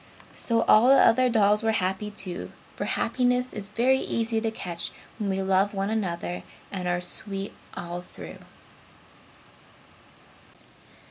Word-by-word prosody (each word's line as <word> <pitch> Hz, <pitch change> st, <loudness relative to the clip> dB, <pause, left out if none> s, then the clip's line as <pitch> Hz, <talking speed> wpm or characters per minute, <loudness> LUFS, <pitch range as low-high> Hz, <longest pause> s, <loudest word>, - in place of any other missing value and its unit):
So 230 Hz, -1 st, +2 dB
all 220 Hz, +3 st, +6 dB
the 270 Hz, -, +8 dB
other 255 Hz, +2 st, +5 dB
dolls 210 Hz, -2 st, +4 dB
were 225 Hz, -1 st, +1 dB
happy, 190 Hz, +1 st, -1 dB
too, 195 Hz, -3 st, -5 dB, 0.2 s
for -, -, -3 dB
happiness 250 Hz, 0 st, +1 dB
is 205 Hz, -1 st, -6 dB
very 255 Hz, +5 st, +3 dB
easy 230 Hz, -2 st, 0 dB
to 225 Hz, -, 0 dB
catch 175 Hz, -6 st, -4 dB, 0.3 s
when 205 Hz, -2 st, -1 dB
we 190 Hz, 0 st, 0 dB
love 195 Hz, +2 st, +2 dB
one 195 Hz, +2 st, -1 dB
another 170 Hz, -, -2 dB, 0.3 s
and 185 Hz, -2 st, -3 dB
are 175 Hz, 0 st, +1 dB
sweet 195 Hz, +2 st, -4 dB, 0.2 s
all 175 Hz, -1 st, -5 dB
through. -, -, -11 dB
205 Hz, 135 wpm, -26 LUFS, 185-225 Hz, 0.3 s, the